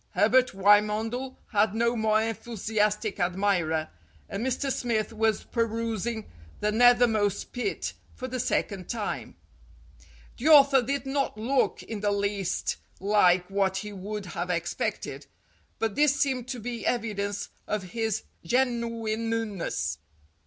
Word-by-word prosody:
Herbert 255 0 +4
Wymondel 215 +6 +2
had 210 -1 +2
no 235 +1 +2
more 220 -1 +2
enthusiastic 215 -2 -1
admirer, 175 -4 +1 0.4
and 205 - -4
Mr. 260 +2 -1
Smith 230 -4 -1
was 220 -1 +1
perusing 230 -1 -2 0.3
"The 210 - +1
Nethermost 225 -3 +4
Pit" 255 +11 -2 0.2
for 255 - -5
the 255 0 -4
second 195 -5 -1
time. 225 -3 -4 1.0
The 255 - -2
author 280 -3 +8
did 275 +3 -2
not 270 -4 -1
look 255 +5 +1
in 220 - -5
the 205 0 +1
least 200 -2 -1 0.2
like 185 -3 +4
what 195 -1 +1
he 210 +1 -5
would 205 +1 -5
have 175 0 -4
expected, 170 -1 -3 0.5
but 225 -2 -1
this 290 +2 +3
seemed 260 -3 0
to 250 - -4
be 235 -1 -5
evidence 205 -4 -2 0.2
of 210 -2 -1
his 225 -3 -1 0.2
genuineness. 230 -2 -1
220 Hz, 125 wpm, -27 LUFS, 205-240 Hz, 1.0 s, author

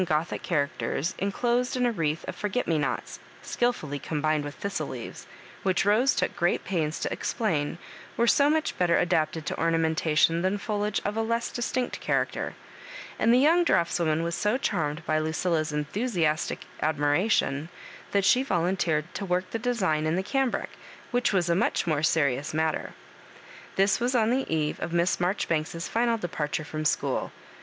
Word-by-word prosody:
Gothic 160 -1 -1
characters, 155 +1 -1
enclosed 240 +6 0
in 250 - +2
a 240 - +2
wreath 165 -6 -2
of - - -4
forget 210 +4 -2
me 160 -2 +2
nots, 140 -3 -3 0.2
skilfully 155 - -1
combined 155 +1 0
with 145 0 -6
thistle 200 0 -3
leaves, - - -8 0.3
which 190 -1 +1
Rose 235 +7 +4
took - - -1
great 175 +1 +1
pains 160 -4 -1
to - - -1
explam 165 -9 -1 0.4
were 235 - +3
so 280 +4 +4
much 315 0 +1
better 175 -2 +3
adapted 160 -2 +1
to - - -2
or 165 - +3
namentation 165 0 +2
than 190 +3 +1
foliage 210 0 -1
of 205 - -1
a - - +2
less 230 +1 -1
distinct 250 +1 -2
cha - - -1
racter; - - -1 0.7
and 225 - +4
the 245 - +6
young 325 +6 +5
draughtswoman 170 - +1
was 170 0 -2
so 210 +7 +1
charmed 160 - -2
by 155 0 +1
Lucilla's 160 0 0
^thusiastic 155 - -1 0.2
admiration, 150 0 +1 0.4
that 200 -1 +1
she 250 +6 +5
volunteered 175 - 0
to - - -4
work 185 -1 -1
the 225 - -2
design 190 -11 0
in 160 - +1
the 190 - 0
cambric, 270 +3 -1 0.4
which 245 0 +2
was 185 -4 +1
a 170 - +3
much 190 +7 +1
more 155 -3 +1
serious 145 -3 +1
matter. 160 -1 -1 0.8
This 195 +1 +3
was 245 +2 0
on 225 -1 +3
the 265 -5 0
eve 155 -2 0
of 170 - -4
Miss 170 +1 +2
Marjori 180 +3 0
banks's 165 +1 -2
final 230 0 +1
departure 155 -5 -3
from 155 +1 -4
school. - - 0
175 Hz, 170 wpm, -27 LUFS, 155-220 Hz, 0.8 s, the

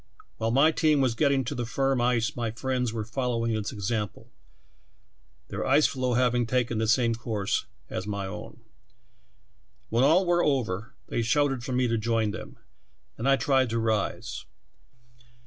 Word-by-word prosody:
While 115 - -1
my 140 +7 +5
team 155 -2 +2
was 130 -3 +2
getting 140 +1 +2
to 115 - -4
the 120 - -3
firm 135 +1 +1
ice 120 -3 +1
my 120 -2 -2
friends 125 +1 -2
were 110 -2 -4
following 115 -1 -1
its 105 -1 -3
example, 105 0 -4 1.2
their - - -3
ice 140 +3 +3
^loe 130 -2 0
having 120 -2 +2
taken 120 -2 0
the 110 - 0
same, 115 +1 +3
course 110 -4 -2 0.2
as 95 - -5
my 100 -2 -3
own. 95 - -8 1.3
When 115 +3 +2
all 165 +7 +5
were 175 0 +3
over, 115 -7 -1
they - - 0
shouted 135 +1 +1
for 130 - -4
me 125 0 +2
to 115 -1 0
join 110 -1 +1
them, 110 - -8 0.6
and 130 +4 -1
I 135 - +6
tried 135 -3 +2
to 115 - -1
rise. 110 -3 -1
120 Hz, 165 wpm, -27 LUFS, 110-135 Hz, 1.3 s, I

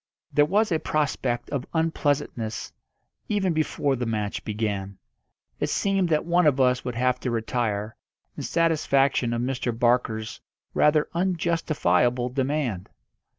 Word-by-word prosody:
There 145 - +5
was 210 +3 +2
a 160 - +2
prospect 140 -6 -1
of 135 -3 -3
unpleasantness 145 -8 -1 0.6
even 195 -4 +1
before 150 -3 0
the 120 -1 -3
match 105 -2 -2
began. 100 -3 -3 0.6
It - - -1
seemed 195 -3 +1
that 155 -2 +1
one 175 -1 +3
of 140 -2 +3
us 125 -1 +3
would 125 -2 -4
have 125 +1 +1
to 125 - -3
retire, 110 -2 -2 0.4
in - - -6
satisfaction 140 -6 +2
of 120 0 -1
Mr. 125 -2 -2
Barker's 115 -2 0 0.3
rather 150 0 +3
unjustifiable 155 - +1
demand. 130 -7 -2
130 Hz, 130 wpm, -25 LUFS, 115-155 Hz, 0.6 s, There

